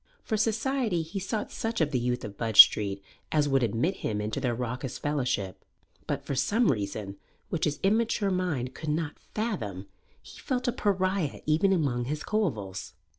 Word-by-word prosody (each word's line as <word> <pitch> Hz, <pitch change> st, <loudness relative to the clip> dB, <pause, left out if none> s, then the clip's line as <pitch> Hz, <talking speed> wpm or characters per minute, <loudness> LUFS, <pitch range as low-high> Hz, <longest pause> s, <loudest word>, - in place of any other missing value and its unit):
For 220 Hz, -, -1 dB
society 225 Hz, -3 st, 0 dB
he 170 Hz, +5 st, -5 dB
sought 210 Hz, +3 st, -3 dB
such 230 Hz, +1 st, -3 dB
of 155 Hz, -3 st, +1 dB
the 130 Hz, -, +1 dB
youth 125 Hz, +1 st, -1 dB
of 100 Hz, -1 st, -8 dB
Budge 110 Hz, -1 st, -1 dB
Street 100 Hz, -2 st, +8 dB, 0.3 s
as 150 Hz, -2 st, +2 dB
would 135 Hz, -1 st, +2 dB
admit 120 Hz, -, 0 dB
him 105 Hz, -1 st, -2 dB
into 105 Hz, +5 st, -2 dB
their 125 Hz, -3 st, 0 dB
raucous 125 Hz, +1 st, -4 dB
fellowship. 125 Hz, -10 st, -2 dB, 0.4 s
But, -, -, -2 dB
for -, -, -2 dB
some 170 Hz, -, +2 dB
reason 100 Hz, -3 st, -4 dB, 0.3 s
which 165 Hz, -, 0 dB
his 145 Hz, -2 st, -1 dB
immature 215 Hz, 0 st, +2 dB
mind 160 Hz, -9 st, -1 dB
could 155 Hz, -, -6 dB
not 150 Hz, 0 st, -2 dB, 0.2 s
fathom, 110 Hz, -, -3 dB, 0.3 s
he -, -, -14 dB
felt 250 Hz, -1 st, -2 dB
a -, -, +3 dB
pariah 190 Hz, -, 0 dB
even 160 Hz, +6 st, +3 dB
among 135 Hz, -9 st, +1 dB
his 150 Hz, +3 st, -3 dB
coevals. 110 Hz, -, -2 dB
150 Hz, 175 wpm, -28 LUFS, 120-195 Hz, 0.4 s, Street